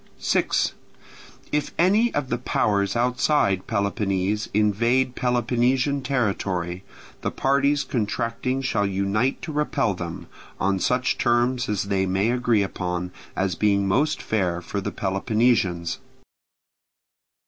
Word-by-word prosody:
6. - - +1 0.8
If 150 -1 -1
any 205 +7 +4
of 145 -3 -1
the - - -1
powers 100 -5 0
outside 125 -5 +1
Peloponnese 100 -1 -1
invade 115 +5 +2
Peloponnesian 125 +3 +1
territory, 100 -8 -1 0.4
the - - -1
parties 140 +1 +1
contracting 120 +2 -2
shall 105 -6 +1
unite 100 +6 0
to 160 - -4
repel 145 -6 0
them, 85 -2 -6 0.3
on 95 0 +1
such 125 +5 +1
terms 120 +1 +1
as 105 -1 0
they 100 -1 0
may 95 +5 +1
agree 120 -4 +2
upon, 90 -2 -3 0.2
as 95 -1 0
being 100 0 +2
most 145 +11 +1
fair 90 -5 0
for 100 +3 -4
the - - -3
Peloponnesians. 95 -3 0
110 Hz, 115 wpm, -24 LUFS, 95-130 Hz, 0.8 s, any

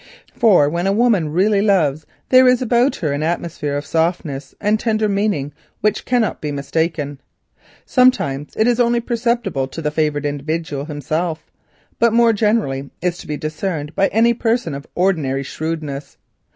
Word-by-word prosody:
For 185 -10 +5
when 170 +5 -1
a - - +3
woman 205 -8 +2
really 195 +5 +2
loves 160 -8 +2
a - - -46
man - - -34 0.2
there 255 0 +7
is 250 -1 +4
about 245 +2 +2
her 155 -4 -2
an 145 - -2
atmosphere 160 -3 -2
of 145 - -5
softness 160 -4 -2
and 210 +1 +1
tender 215 -2 +1
meaning 200 -9 -1 0.3
which 210 0 0
can 245 -1 +2
scarcely 215 - -2
be 150 - -3
mistaken. 145 0 -2 0.6
Sometimes 150 - +2
it 220 - +2
is 245 0 +2
only 240 0 +3
perceptible 235 - -1
to 135 - -8
the 150 -2 -2
favoured 150 -1 0
individual 145 0 -3
himself, 155 +2 -3 0.5
but 235 -1 +3
more 235 -1 +5
generally 205 -11 0
is 180 0 -2
to - - -11
be 150 -1 -3
discerned 155 0 -4
by 195 - +2
any 230 +2 +3
person 230 - -1
of 140 +1 -7
ordinary 155 -8 0
shrewdness. 155 -1 -5
170 Hz, 170 wpm, -19 LUFS, 145-220 Hz, 0.6 s, there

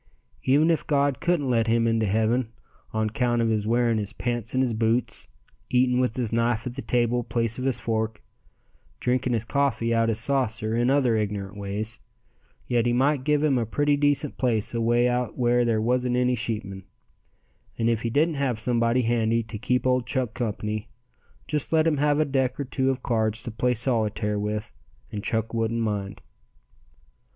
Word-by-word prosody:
Even 150 +5 +4
if 165 - -1
God 140 -2 +1
couldn't 170 -5 0
let 115 -2 +2
him 115 0 +2
into 115 -1 +1
heaven 110 +3 +1 0.4
on 110 -1 -1
'count 120 -2 0
of 115 -1 +2
his 110 -1 0
wearing 115 -1 +2
his 100 -2 -4
pants 120 -1 -3
in 130 - +3
his 125 -3 +1
boots, 115 +2 -1 0.4
eating 125 0 +3
with 125 -3 0
his 120 -3 -2
knife 115 0 +1
at 125 - -4
the 135 - -6
table 120 -1 +1
place 115 0 -1
of 130 - -3
his 135 -2 +1
fork, 110 -1 -2 0.8
drinking 125 0 0
his 115 -1 -1
coffee 120 -4 0
out 115 0 +2
his 110 - 0
saucer 115 -4 -1
and 120 +2 +2
other 135 -4 +3
ignorant 105 -2 -3
ways, 105 +2 -4 0.7
yet 120 -1 +1
He 120 - +2
might 135 +2 +2
give 150 +1 +2
him 140 -4 +3
a 115 - -1
pretty 145 +5 +2
decent 145 0 +1
place 115 -5 0
away 120 +1 +2
out 125 -1 -1
where 120 -1 +3
there 115 -2 +1
wasn't 125 +2 +1
any 125 0 +2
sheepmen, 105 -5 -3 0.9
and 115 - 0
if 115 -2 +1
He 115 - -1
didn't 150 +5 +1
have 125 -5 0
somebody 120 +1 +1
handy 115 0 +1
to 110 0 -7
keep 125 +2 0
old 125 -1 +1
Chuck 125 -4 -1
company 110 -2 -3 0.6
just 150 -2 0
let 160 -1 +3
him 160 -3 +2
have 145 +1 +2
a 155 - +3
deck 130 -2 -1
or 140 - -2
two 130 0 0
of 130 -1 -2
cards 110 -1 0
to 120 - -5
play 125 +3 0
solitaire 110 -3 0
with 105 +1 -3 0.4
and 105 -3 -5
Chuck 110 0 -2
wouldn't 115 0 0
mind. 100 -3 -3
120 Hz, 185 wpm, -25 LUFS, 110-130 Hz, 0.9 s, Even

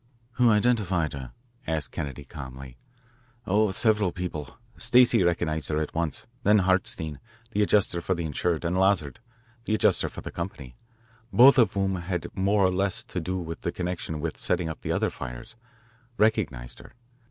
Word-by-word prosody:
"Who 125 -1 +3
identified 105 -7 +2
her?" 65 -3 -7 0.4
asked 80 -2 -2
Kennedy 70 0 -5
calmly. 65 -3 -9 0.7
"Oh, 105 +2 +3
several 105 -1 +2
people. 85 -6 -6 0.2
Stacey 125 -4 +4
recognised 85 -3 0
her 75 0 0
at 80 - -3
once. 80 -4 -3 0.2
Then 105 -2 +5
Hartstein, 90 -6 0 0.3
the 105 - 0
adjuster 100 -4 +2
for 95 +2 0
the 85 -1 -3
insured, 80 +2 -1
and 90 +2 0
Lazard, 95 -7 +2 0.5
the 110 - +1
adjuster - - +2
for - - -9
the - - -7
company, 75 -8 -6 0.6
both 130 +3 +7
of 115 - +3
whom 95 -1 0
had 90 0 -3
had - - -9
more 100 +1 +3
or 95 - +3
less 100 +4 0
to 90 - -5
do 90 +2 -3
with 80 -2 -6
her - - 0
in - - -7
connection 90 -3 -3
with 80 +1 -4
settling 90 -2 0
up 80 - -7
for - - -3
other - - +1
fires, 60 - -7 0.6
recognised 95 - 0
her. - - -14
90 Hz, 175 wpm, -26 LUFS, 80-100 Hz, 0.7 s, both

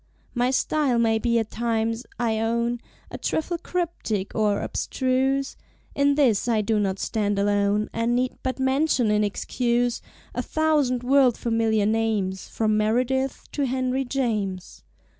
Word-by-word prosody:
My 245 0 +1
Style 270 -1 +1
may 225 -1 +2
be 235 +1 +1
at 225 -1 -1
times, 230 +1 -1
I 225 -2 0
own, 235 +1 0 0.3
A - - -6
trifle 335 +2 -2
cryptic 330 - -3
or 210 -2 +1
abstruse; 265 +1 0 0.4
In 280 0 +2
this 245 -7 +2
I 225 -3 +2
do 215 +1 +1
not 195 -2 0
stand 205 0 -1
alone, 205 +1 +1
And 230 +1 0
need 255 +1 0
but 260 0 -2
mention, 265 -3 +2
in 210 0 +2
excuse, 240 +3 0 0.3
A 245 - -1
thousand 290 -4 +1
world 260 -2 +4
familiar 225 -2 +1
names, 210 -4 0
From 215 -1 0
Meredith 250 +5 0
to 285 -2 -1
Henry 255 +1 0
James. 215 -8 -3
235 Hz, 140 wpm, -24 LUFS, 215-265 Hz, 0.4 s, world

